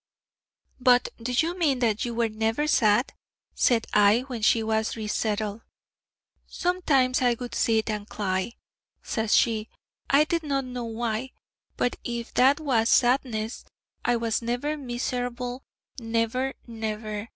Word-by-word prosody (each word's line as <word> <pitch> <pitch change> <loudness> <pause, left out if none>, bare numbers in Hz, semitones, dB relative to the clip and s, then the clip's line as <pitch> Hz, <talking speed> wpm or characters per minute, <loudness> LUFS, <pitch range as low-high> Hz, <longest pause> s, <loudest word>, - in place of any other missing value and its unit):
'But 250 -1 +4
do 240 +2 -3
you 325 +8 +1
mean 310 -7 +2
that 230 -3 0
you 235 -1 -4
were 235 0 +2
never 225 +6 -1
sad?' 230 -5 +3 0.4
said 235 -3 +2
I 210 +3 +5
when 255 -3 -6
she 225 +1 +3
was 220 +1 -1
re 220 - -4
settled. 210 0 -2 0.9
'Sometimes 285 -9 +1
I 245 -2 +3
would 245 +1 -7
sit 220 -1 +1
and 210 0 -5
cly,' 190 +2 -2 0.5
says 220 -2 0
she 220 -1 +1 0.4
'I 280 +2 +6
did 335 +2 -1
not 275 -3 -1
know 250 -1 -5
why. 230 +2 -3 0.4
But 245 - 0
if 235 -1 -5
that 270 +4 +4
was 240 -7 +1
"sadness," 240 -3 +1 0.4
I 240 - +2
was 230 -1 -1
never 245 +6 -2
miserlable, 245 -1 -3 0.4
never, 230 +3 -1
never. 215 -1 -5
235 Hz, 140 wpm, -26 LUFS, 220-255 Hz, 0.9 s, I